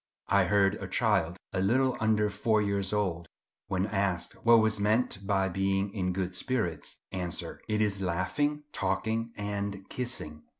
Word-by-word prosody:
I 100 -2 +4
heard 100 +1 +2
a - - -4
child, 85 +3 +1 0.2
a - - 0
little 125 +6 +2
under 105 -1 +2
four 105 +2 +2
years 100 -2 0
old, 90 -5 -1 0.4
when 95 0 0
asked 100 -4 -1
what 115 0 +7
was 110 -1 +2
meant 105 -1 +1
by 95 -1 +2
being 95 +1 0
in 90 -3 -1
good 95 0 -2
spirits, 90 - -2
answer, 90 -2 -4
"It 105 0 +1
is 100 -2 0
laughing, 120 - 0
talking, 110 +4 -1
and 100 -1 -3
kissing." 120 -12 -3
100 Hz, 155 wpm, -29 LUFS, 95-110 Hz, 0.4 s, what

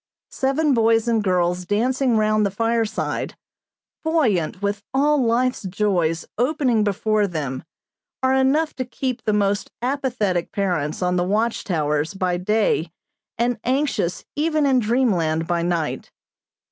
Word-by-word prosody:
Seven 275 +2 +1
boys 225 -1 +3
and 225 -2 +2
girls 180 -1 +1
dancing 240 +5 +1
round 215 0 +2
the 200 - +2
fireside, 225 +2 -1 0.7
buoyant 235 - +1
with 200 0 -2
all 290 0 +3
life's 245 +2 +1
joys 180 -4 0
opening 250 -4 +2
before 210 +1 +1
them, 145 -7 -4 0.6
are 260 0 +3
enough 275 +4 +2
to 260 - -1
keep 250 0 -3
the 215 - +2
most 205 0 0
apathetic 240 -9 -1
parents 175 -5 -1
on 180 0 +1
the 175 - +2
watch 215 +5 0
towers 155 -1 -1
by 185 -2 0
day 185 -3 +1 0.5
and 240 0 0
anxious 255 - -1
even 310 0 +1
in 265 -2 +4
dreamland 200 -10 +1
by 170 0 0
night. 170 -2 -2
215 Hz, 135 wpm, -22 LUFS, 180-255 Hz, 0.7 s, in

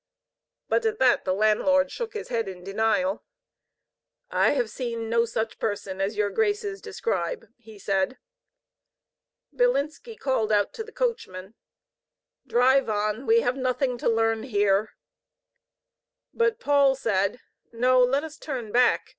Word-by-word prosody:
But 475 - +1
at 440 0 -2
that 255 - +3
the 185 - +1
landlord 215 +7 +2
shook 465 -2 -5
his 430 - -6
head 230 -3 -1
in 180 -2 -8
denial. 225 +9 0 1.1
"I - - +3
have 485 -2 -1
seen 230 -3 -4
no 230 0 +3
such 225 -1 -3
person 195 -2 -3
as 200 +2 -2
your 205 -1 +1
graces 415 -2 -1
describe," 470 - -3
he 220 -2 -14
said. 195 +5 -1 1.4
Bilinski 455 - 0
called 230 -5 0
out 205 -1 +2
to 445 - -5
the 455 - -13
coachman: 210 - -3 0.9
"Drive 260 +1 +3
on. 215 +4 -1
We 460 +1 +5
have 255 - -1
nothing 255 -1 -1
to - - +1
learn 225 -1 +1
here." 205 -3 +1 1.4
But 460 -1 +1
Paul 280 - +3
said: 200 -2 0 0.3
"NQ 250 +2 +4
let 275 +3 +1
us 315 -1 -8
turn 250 -8 -5
back. 245 +2 +3
245 Hz, 140 wpm, -25 LUFS, 215-285 Hz, 1.4 s, We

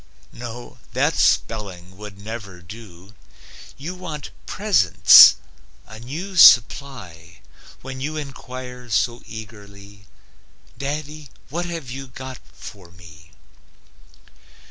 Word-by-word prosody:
No, 120 0 -9
that - - +1
spelling 95 -5 -1
would 105 -1 -11
never 105 -3 -8
do; 95 0 -13 0.6
You 155 +7 -6
want 160 -6 -8 0.2
Presents, 190 - +7 0.5
a 110 +1 -12
new 160 - -7
supply, 110 - +4 0.4
When 130 0 -8
you 155 +3 -4
inquire 125 -3 -9
so 120 +3 0
eagerly: 100 -3 -12 0.7
"Daddy, 150 +1 -6 0.2
what 170 +5 -3
have 165 -8 -6
you 135 +1 -7
got 130 +1 -9
for 95 -4 -12
me?" 85 -2 -17
120 Hz, 100 wpm, -21 LUFS, 100-140 Hz, 0.7 s, Presents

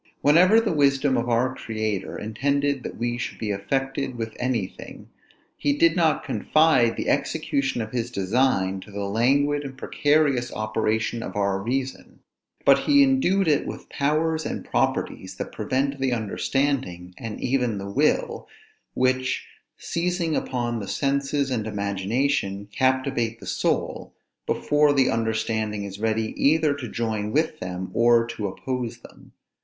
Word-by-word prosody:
Whenever 180 +9 +6
the 225 -6 0
wisdom 140 -2 +3
of 120 +1 -1
our 125 +2 +2
Creator 110 -5 -3
intended 140 +5 0
that - - -7
we 120 0 -2
should - - -4
be 110 -2 -3
affected 135 +6 -2
with 110 -2 -5
anything, 120 -7 -4 0.5
he 145 - +1
did 165 +1 +4
not 165 -3 +2
confide 155 -7 +3
the - - -3
execution 135 -4 0
of 110 - -8
his 120 -1 -2
design 100 -3 +1
to 100 - -13
the 100 0 -5
languid 140 +8 +2
and 135 -2 -8
precarious 145 -4 +1
operation 110 +1 -1
of 95 - -6
our 100 -1 0
reason; 130 +4 -4 0.4
but - - +6
he 285 -1 +5
endued 200 -9 +2
it 150 -2 +2
with - - -8
powers 155 +3 0
and - - -4
properties 95 0 -1
that - - -5
prevent 135 +5 -1
the 135 -1 +1
understanding, 110 -4 -1
and 115 -2 -6
even 125 -4 0
the 100 0 -5
will; - - +1 0.5
which, 130 0 +1 0.3
seizing 170 -2 -1
upon 120 -2 -2
the 100 - -6
senses 140 +1 0
and 110 -4 -1
imagination, 100 +1 -1
captivate 130 -3 0
the - - -11
soul, - - -2 0.3
before 150 0 +3
the 135 -2 +3
understanding 110 -2 -1
is 100 0 -7
ready 110 0 0
either 155 0 +4
to 135 -5 -6
join 110 -2 -2
with 155 +3 0
them, 90 0 -5
or 115 0 +4
to 110 -3 -4
oppose 125 +4 -4
them. - - -16
125 Hz, 145 wpm, -24 LUFS, 110-140 Hz, 0.5 s, Whenever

